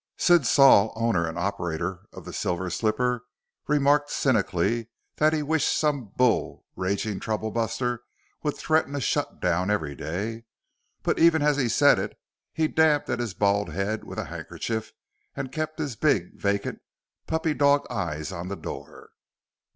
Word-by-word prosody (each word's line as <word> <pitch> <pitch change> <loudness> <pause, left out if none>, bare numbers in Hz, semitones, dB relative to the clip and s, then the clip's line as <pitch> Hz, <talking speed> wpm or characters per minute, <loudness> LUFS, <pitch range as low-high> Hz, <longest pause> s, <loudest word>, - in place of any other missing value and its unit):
Sid 175 -8 +4
Saul, 120 -7 +6
owner 110 -7 +1
and 80 +1 -5
operator 90 -1 -3
of - - -11
the - - -8
Silver 90 0 -2
Slipper, 120 +4 0 0.4
remarked 145 0 +3
cynically 110 -4 +1 0.3
that 155 +1 +4
he 155 -1 0
wished 160 0 +1
some 145 -5 0
bull 125 -3 +1
ragging 100 +2 -2
troublebuster 115 +2 -2 0.4
would 150 -2 -2
threaten 155 -2 +1
a - - -1
shut - - -1
down 90 +2 +1
every 80 -9 0
day. 105 +11 -4 0.6
But - - 0
even 160 -2 +5
as 150 -1 +3
he 130 -4 +1
said - - +5
it, - - -4 0.3
he 160 -1 +1
dabbed 155 -2 +2
at - - -1
his 115 -5 -3
bald 100 -2 +1
head 100 +7 -2
with - - -9
a - - -2
handkerchief 110 -1 -5 0.4
and 135 -2 -4
kept 155 0 -3
his 145 -6 -3
big, 105 - +1
vacant, 100 0 -2 0.5
puppy 160 -1 0
dog 145 0 +3
eyes 80 0 -3
on 85 -1 -5
the 100 - -4
door. - - -9
115 Hz, 155 wpm, -26 LUFS, 100-145 Hz, 0.6 s, Saul